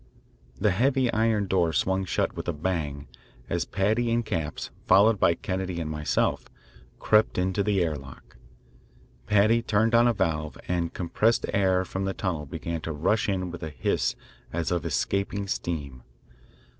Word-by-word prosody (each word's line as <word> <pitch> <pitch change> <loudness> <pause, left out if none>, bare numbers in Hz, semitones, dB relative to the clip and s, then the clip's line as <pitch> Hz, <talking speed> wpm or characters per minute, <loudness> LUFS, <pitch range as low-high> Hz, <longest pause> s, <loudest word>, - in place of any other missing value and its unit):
The 105 0 +3
heavy 130 +4 +2
iron 110 -2 +2
door 90 -3 +2
swung 95 +2 +1
shut - - -1
with - - -6
a 85 - 0
bang 75 -4 -3 0.4
as - - 0
Paddy 110 +5 0
and 120 0 +1
Capps, 80 -8 -3 0.2
followed 105 +2 +5
by 85 - +4
Kennedy 95 -1 -3
and 80 -2 -3
myself, 75 -1 0 0.5
crept 110 0 +3
into 95 +2 +1
the 100 -2 +2
air 80 -3 -1
lock. 70 -2 -12 0.9
Paddy 110 +3 +4
turned 110 +1 +1
on 120 +1 +6
a 120 - +3
valve, 75 -6 -1
and 85 -2 -1
compressed 105 +6 +1
air 95 -2 +2
from 95 +1 -3
the 95 - -2
tunnel 85 -7 -3
began 85 +4 -4
to 80 - -4
rush 95 +9 +1
in 90 -2 -1
with 90 - -8
a 80 - -4
hiss 75 - -1 0.4
as 85 0 -2
of 85 -1 -1
escaping 100 +5 -1
steam. 70 -9 -4
95 Hz, 160 wpm, -26 LUFS, 80-105 Hz, 0.9 s, on